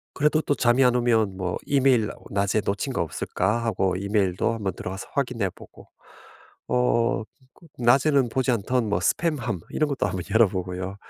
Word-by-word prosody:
그래도 150 +2 +2
또 145 - 0
잠이 125 +1 +3
안 125 -1 +4
오면 110 -5 +1
뭐 90 -2 -2
'이메일 130 -6 +3
어 - - -12 0.2
낮에 100 +1 +1
놓친 105 +7 -2
거 - - -1
없을까?' 95 +7 -1
하고 95 -4 0
이메일도 100 +1 0
한번 100 -4 -3
들어가서 95 +2 -7
확인해 125 -8 -1
보고 - - -16 0.8
어 120 -2 +1 0.4
그 - - -18
낮에는 135 +2 +3
보지 130 +2 0
않던 120 +1 0
뭐 105 - +1
스팸함 130 - -1
이런 155 -1 0
것도 140 -6 -1
한번 95 -2 -3
열어 110 0 +6
보고요. 90 0 -4
115 Hz, 340 characters per minute, -24 LUFS, 95-125 Hz, 0.8 s, 열어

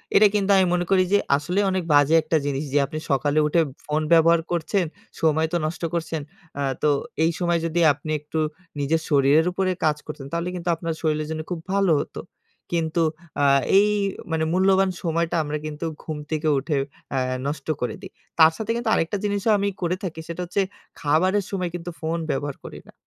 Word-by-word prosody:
এটা 210 - +8
কিন্তু 200 -1 +1
আমি 190 - +5
মনে 175 0 +1
করি 190 -1 +5
যে - - +7 0.2
আসলেই 180 +7 0
অনেক 185 -1 -1
বাজে 145 +2 +5
একটা 160 0 +1
জিনিস 140 0 -1
যে - - +3
আপনি 155 +3 -5
সকালে 145 +2 +2
উঠে 165 +2 +3 0.2
ফোন 150 +1 0
ব্যবহার 165 0 +5
করছেন। 175 +3 0 0.4
সময় 160 0 +3
তো - - +3
নষ্ট 160 +2 -4
করছেন। 165 -2 -2 0.4
আ - - -1 0.2
তো 150 - +4 0.3
এই 165 - +3
সময় 175 -1 +1
যদি 165 +1 -1
আপনি 150 +2 -7
একটু 150 +2 -4 0.4
নিজের 155 +3 +1
শরীরের 145 +2 +4
উপরে 185 +1 0
কাজ 150 -1 +2
করতেন, 150 -3 -7
তাহলে 170 +1 -1
কিন্তু 175 0 -3
আপনার 165 0 -3
শরীরের 155 -1 0
জন্য 160 0 -3
খুব 175 - -2
ভালো 195 -3 +3
হতো। - - -5 0.5
কিন্তু 165 -1 0 0.4
আ - - +5 0.3
এই 205 +1 +6 0.4
মানে 160 -1 +1
মূল্যবান 190 +1 +4
সময়টা 170 0 0
আমরা 150 +1 -3
কিন্তু 155 +1 -5 0.2
ঘুম 155 -2 -4
থেকে 155 0 -1
উঠে 145 +2 -1 0.4
আ - - +2 0.3
নষ্ট 145 -1 -4
করে 120 -3 -2
দেই। 190 - -10 0.3
তার 160 0 +8
সাথে 220 0 -2
কিন্তু 235 -1 -1
আরেকটা 165 +5 +1
জিনিসও 205 +1 +1
আমি 200 0 0
করে 175 +1 0
থাকি। 170 -4 -4
সেটা 170 +1 -5
হচ্ছে 180 +3 0 0.4
খাবারের 185 +7 +2
সময় 185 -3 -2
কিন্তু 175 0 -5
ফোন 160 +1 -1
ব্যবহার 140 0 -3
করি - - -8
না। - - -15
165 Hz, 190 wpm, -23 LUFS, 155-180 Hz, 0.5 s, এটা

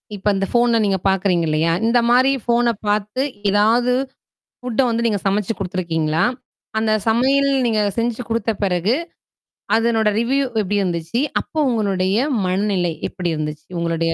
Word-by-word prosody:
இப்ப 200 +1 -6
இந்த 195 0 0
ஃபோன 240 -1 +3
நீங்க 195 -1 +1
பாக்குறீங்க 185 -3 +1
இல்லையா? 160 +2 +1
இந்த 240 +1 +3
மாரி 255 +3 +4
ஃபோன 240 0 +2 0.2
பாத்து 210 +4 0 0.3
ஏதாவது 225 +5 +3 0.7
ஃபுட்ட 250 0 -1
வந்து 235 0 -1
நீங்க 210 -3 +1
சமைச்சு 205 +2 0
குடுத்துருக்கீங்களா? 170 -4 -1 0.5
அந்த 220 0 0 0.2
சமையல் 265 +5 +3 0.2
நீங்க 220 -2 +1 0.2
செஞ்சு 235 +1 -1
குடுத்த 230 -1 -1
பிறகு. 185 +4 +1 0.8
அதனோட 225 -1 +2
ரிவ்யூ 270 +4 +1 0.2
எப்படி 205 +1 -1
இருந்துச்சு. 175 +4 -2 0.2
அப்போ 315 - -6
உங்களுடைய 195 -5 0 0.3
மனநிலை 185 -2 0 0.2
எப்படி 180 -2 -4
இருந்துச்சு. 150 0 -5
உங்களுடைய 165 0 0
205 Hz, 135 wpm, -20 LUFS, 180-235 Hz, 0.8 s, மாரி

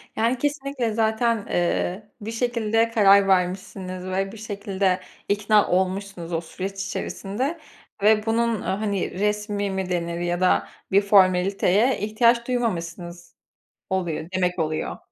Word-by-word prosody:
Yani 230 +3 +1
kesinlikle 275 -4 -2
zaten, 225 +1 +1
ııı, 190 +1 -2
bir 220 +2 -5
şekilde 230 -1 +1
karar 200 -3 +6
vermişsiniz 185 0 -1
ve 195 +1 -2
bir 225 - -10
şekilde 200 -3 -1 0.3
ikna 205 +1 +3
olmuşsunuz 185 -1 -1
o 165 - 0
süreç 195 +4 -6
içerisinde 250 - -3 0.4
ve 215 0 +4
bunun, 230 0 +1
ııı, - - -8
hani, 200 -3 -2
resmî 210 -1 -1
mi 190 -1 -3
denir 170 -1 -2
ya 175 0 -1
da 185 - +3 0.2
bir 200 - +5
formaliteye 195 +3 +3
ihtiyaç 235 +3 +2
duymamışsınız 175 -7 -3 0.5
oluyor 175 -4 -2
demek 180 -1 0
oluyor. 155 -1 -2
200 Hz, 125 wpm, -24 LUFS, 185-220 Hz, 0.5 s, karar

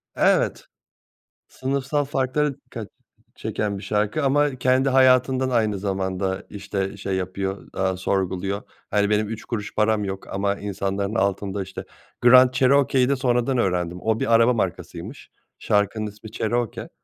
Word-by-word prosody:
Evet. - - +2 0.8
Sınıfsal 140 +2 -1
farklara 140 +2 0
dikkat - - -9 0.5
ç - - -23
çeken 105 -2 -2
bir 95 - -9
şarkı 105 +8 0
ama 145 0 +2
kendi 130 +1 +2
hayatından 130 0 +4
aynı 110 -5 +1
zamanda, 95 -1 -2
işte, 100 0 -4
şey 95 0 -3
yapıyor, 95 +1 -3
eee, 95 -1 0
sorguluyor. 95 +1 -1 0.3
Hani, 105 0 +2
benim 105 0 +2
3 110 -1 -6
kuruş 105 -4 -5
param 105 0 +2
yok 95 -1 -5
ama 100 +1 0
insanların 100 +1 -3
altında, 100 -1 0
işte 95 - -8 0.4
Grand 125 +1 +7
Cherokee'yi 130 0 +3
de 140 - +3
sonradan 125 0 +1
öğrendim. 90 -4 0
O 110 0 0
bir 115 - +1
araba 115 +2 +5
markasıymış. 90 - -4 0.3
Şarkının 105 +1 0
ismi 105 +1 -11
Cherokee. 115 0 -2
105 Hz, 140 wpm, -23 LUFS, 95-130 Hz, 0.8 s, Grand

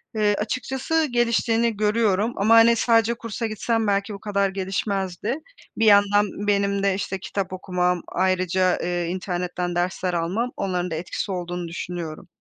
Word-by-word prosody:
Eee, 210 -1 +2
açıkçası 265 +8 -1
geliştiğini 235 -1 +1
görüyorum 215 0 +1
ama, 215 +3 +4
hani, 230 +1 +7
sadece 230 0 +3
kursa 230 0 -5
gitsem 220 +1 -1
belki 200 +1 0
bu 200 - -8
kadar 200 -1 0
gelişmezdi. 195 - -2 0.4
Bir 225 - +2
yandan 205 0 +5 0.2
benim 200 -1 +1
de, 200 -1 +3
işte, 190 0 -3
kitap 190 0 -4
okumam, 180 -1 0
ayrıca, 185 0 +1
eee, 175 0 -1
internetten 180 -1 -3
dersler 180 +1 -1
almam, 180 +9 -1
onların 180 -2 -2
da - - -1
etkisi 175 +4 -4
olduğunu 175 -1 -4
düşünüyorum. 170 -2 -6
200 Hz, 145 wpm, -23 LUFS, 180-220 Hz, 0.4 s, hani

